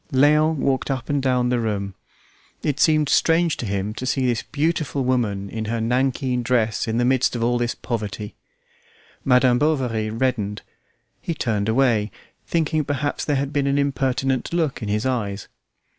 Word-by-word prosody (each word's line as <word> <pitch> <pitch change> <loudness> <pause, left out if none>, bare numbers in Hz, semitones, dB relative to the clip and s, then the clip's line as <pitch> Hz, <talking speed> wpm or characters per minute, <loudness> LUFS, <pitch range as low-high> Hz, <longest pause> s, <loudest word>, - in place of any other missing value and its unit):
Léon 150 +4 +4
walked 135 -1 0
up 130 -3 -3
and 145 -1 +1
down 125 -2 +1
the 125 -1 +1
room; 100 -4 -2 0.7
it 145 -1 -1
seemed 155 -1 +4
strange 165 +3 +3
to 120 - -4
him 100 +1 -2
to 130 +3 -5
see 130 0 +1
this 120 -3 +1
beautiful 150 -2 -1
woman 110 -6 0
in 110 +2 -5
her 115 +2 -2
nankeen 125 +2 0
dress 115 -3 0
in 110 +1 -1
the 120 - +2
midst 130 -1 +2
of 115 - -1
all 120 +1 +1
this 120 0 -1
poverty. 105 -2 -4 0.9
Madam 125 -2 +4
Bovary 125 -8 0
reddened; 110 -3 -1 0.6
he 170 - -3
turned 110 -6 -1
away, 115 -3 +2 0.4
thinking 160 -2 +1
perhaps 145 +1 -2
there 145 - 0
had 140 +1 -2
been 140 -2 +1
an 140 +1 +1
impertinent 135 -2 0
look 160 -6 -1
in 105 - -4
his 105 +3 0
eyes. 105 -6 -2
125 Hz, 170 wpm, -22 LUFS, 110-140 Hz, 0.9 s, Léon